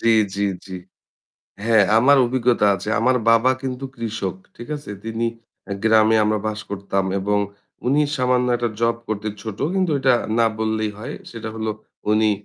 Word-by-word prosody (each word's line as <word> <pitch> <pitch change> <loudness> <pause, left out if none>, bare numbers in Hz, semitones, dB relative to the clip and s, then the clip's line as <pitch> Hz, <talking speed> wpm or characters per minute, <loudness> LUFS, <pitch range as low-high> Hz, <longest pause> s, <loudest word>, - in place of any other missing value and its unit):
জ্বি, 115 0 +4 0.2
জ্বি, 100 0 0 0.2
জ্বি। 95 -1 -7 0.9
হ্যাঁ 110 -3 +5
আমার 140 +4 +6
অভিজ্ঞতা 120 -3 +2
আছে। 95 +3 -6
আমার 125 +2 +3
বাবা 115 +3 +5
কিন্তু 130 0 -4
কৃষক, 105 -5 -3 0.2
ঠিক 120 - -9
আছে? 145 -6 -10
তিনি 115 +1 -1 0.4
অ্যা 100 - -4
গ্রামে 110 0 +5
আমরা 105 0 +1
বাস 110 0 -2
করতাম। 100 -1 -1 0.2
এবং 105 +1 +1 0.5
উনি 145 +4 +3
সামান্য 125 -1 +2
একটা 120 -1 -1
জব 115 0 +2
করতে 110 0 -2
ছোট 110 -3 -6 0.2
কিন্তু 185 -3 +1
এটা 130 -2 +4 0.2
না 115 - +5
বললেই 110 -1 0
হয়। 130 +7 -6 0.2
সেটা 115 -1 -6
হলো 110 -1 -2 0.4
উনি 110 0 +4
115 Hz, 165 wpm, -21 LUFS, 105-125 Hz, 0.9 s, আমার